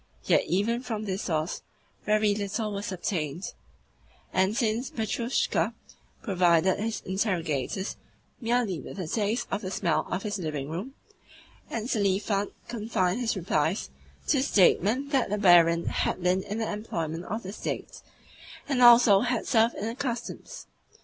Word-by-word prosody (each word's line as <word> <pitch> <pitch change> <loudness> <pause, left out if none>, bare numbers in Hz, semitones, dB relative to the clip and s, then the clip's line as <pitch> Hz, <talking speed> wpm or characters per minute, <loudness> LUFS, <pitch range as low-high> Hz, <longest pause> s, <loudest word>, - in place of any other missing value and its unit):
Yet - - +3
even 220 +6 0
from 220 -4 -4
this 190 -1 -2
source 160 -1 -2 0.4
very 210 0 +3
little 210 +1 -2
was 200 0 -4
obtained, 175 -3 -3 0.8
since 215 +5 +1
Petrushka 230 +2 -1 0.5
provided 180 -4 +3
his 225 +1 -2
interrogators 185 - -1 0.4
merely 230 -7 0
with 135 - -9
a 185 -4 -4
taste 220 +6 0
of 200 - -1
the 185 - -4
smell 180 -3 0
of 180 +2 -2
his 205 -1 -3
living 150 -4 -4
room, 205 - -5 0.7
and 230 0 -3
Selifan 200 -2 0 0.2
confined 215 -4 -1
his 235 -3 0
replies 170 0 -1 0.4
to 280 - +4
a - - +2
statement 250 - +3
that 270 -6 +2
the 210 - 0
barin 170 -4 +5
had 185 - -1
"been 180 +1 +2
in 205 +2 -5
the 225 -2 -2
employment 170 -6 -4
of 220 +2 -4
the 190 +1 -6
State, - - -5 0.7
and 270 -4 0
also 240 -4 +8
had 245 +1 -1
served 230 -2 +3
in 205 - -4
the 225 - -2
Customs." 260 - -5
205 Hz, 145 wpm, -27 LUFS, 180-230 Hz, 0.8 s, also